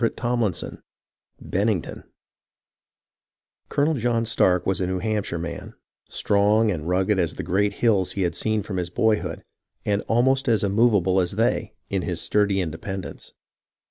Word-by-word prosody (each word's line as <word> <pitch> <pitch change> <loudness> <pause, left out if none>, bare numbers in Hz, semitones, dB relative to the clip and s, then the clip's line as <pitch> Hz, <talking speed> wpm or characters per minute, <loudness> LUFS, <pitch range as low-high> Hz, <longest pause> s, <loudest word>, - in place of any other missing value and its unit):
CHAPTER 115 - 0
XX 120 -7 -1 0.6
BENNINGTON 100 -2 -1 1.7
Colonel 150 +2 +2
John 115 -3 0
Stark 90 -5 +2
was 95 -1 0
a 90 - 0
New 95 0 -1
Hampshire 105 -2 -2
man, 85 0 -6 0.3
strong 105 +2 +2
and 80 -4 -4
rugged 95 +2 +2
as 85 -3 -1
the - - -5
great 100 +3 +1
hills 105 -6 +1
he 100 - -1
had 85 -2 0
seen 110 +3 -1
from 100 -2 -5
his 90 -1 -2
boyhood, 90 -4 0 0.4
and 100 0 +1
almost 130 +4 +2
as 110 -4 +2
immovable 100 -3 +3
as 90 +2 -2
they 110 0 0 0.2
in 95 -2 0
his 85 -2 -3
sturdy 100 -2 +1
independence. 90 +3 -6
100 Hz, 145 wpm, -24 LUFS, 90-110 Hz, 1.7 s, immovable